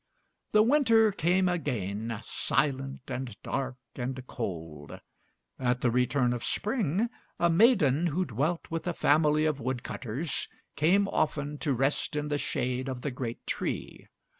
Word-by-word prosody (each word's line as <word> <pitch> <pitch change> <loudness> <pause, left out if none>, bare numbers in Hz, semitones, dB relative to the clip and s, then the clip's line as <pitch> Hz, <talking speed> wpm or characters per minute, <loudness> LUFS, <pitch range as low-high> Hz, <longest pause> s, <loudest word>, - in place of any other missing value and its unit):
The 215 0 +6
winter 230 -4 +5
came 185 +1 +2
again, 115 - -2
silent 135 -1 -1
and 125 -4 -5
dark 130 -2 -2 0.2
and 130 0 -4
cold. 80 - -6 0.6
At 125 -1 +1
the 120 - +2
return 125 +1 +2
of 120 - -4
spring, 210 - 0 0.3
a 170 0 +4
maiden 175 - +4
who 180 +4 0
dwelt 150 +9 -2
with 165 +2 -3
a 175 - 0
family 155 0 +3
of 150 -3 0
wood 125 0 -2
cutters 135 +7 -3 0.3
came 190 +6 +3
often 145 -4 -1
to 145 - 0
rest 135 +4 0
in 150 0 -2
the 145 -1 0
shade 130 0 -1
of 130 -1 -4
the 145 - -2
great 120 -2 -5
tree. - - -4
140 Hz, 145 wpm, -29 LUFS, 125-170 Hz, 0.6 s, The